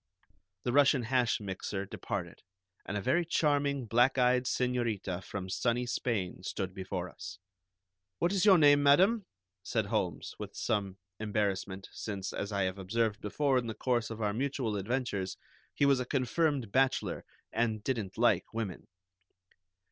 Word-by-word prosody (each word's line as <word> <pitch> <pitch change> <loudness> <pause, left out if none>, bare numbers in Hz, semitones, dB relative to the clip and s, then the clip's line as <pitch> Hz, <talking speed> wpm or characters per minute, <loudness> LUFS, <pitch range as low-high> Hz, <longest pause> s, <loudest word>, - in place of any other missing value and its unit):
The 120 - -1
Russian 140 -2 +5
hash 125 0 +1
mixer 100 0 -4
departed, - - -5 0.5
and 100 - -2
a - - -2
very 170 - +2
charming 145 -5 +1
black 120 +4 +3
eyed 125 0 +3
señorita 115 -8 -1
from 100 -2 -5
sunny 120 +6 0
Spain 110 -7 -2
stood 95 0 -4
before 95 -2 -4
us. 90 +1 -9 0.8
"What 175 - +1
is 190 -2 +2
your 195 -3 +8
name, 145 -2 +6
madam?" 185 +9 +4 0.3
said 110 +2 -1
Holmes, 90 -4 -2
with - - -7
some 100 -3 -1 0.2
embarrassment, 100 -3 -2
since, 95 -3 -5
as 100 - -3
I 100 -1 +1
have 95 +1 -2
observed 105 +2 0
before 135 +5 +1
in 120 - -5
the 110 - -4
course 120 -3 0
of 115 -1 -5
our 105 -1 +1
mutual 130 -2 -1
adventures, 100 -2 -2 0.3
he 145 - +1
was 140 -2 +4
a 125 - -2
confirmed 135 -2 0
bachelor, 135 +2 +1 0.3
and 110 -2 0
didn't 110 -7 -2
like 120 +2 +2
women. 105 -6 -4
115 Hz, 150 wpm, -31 LUFS, 100-130 Hz, 0.8 s, your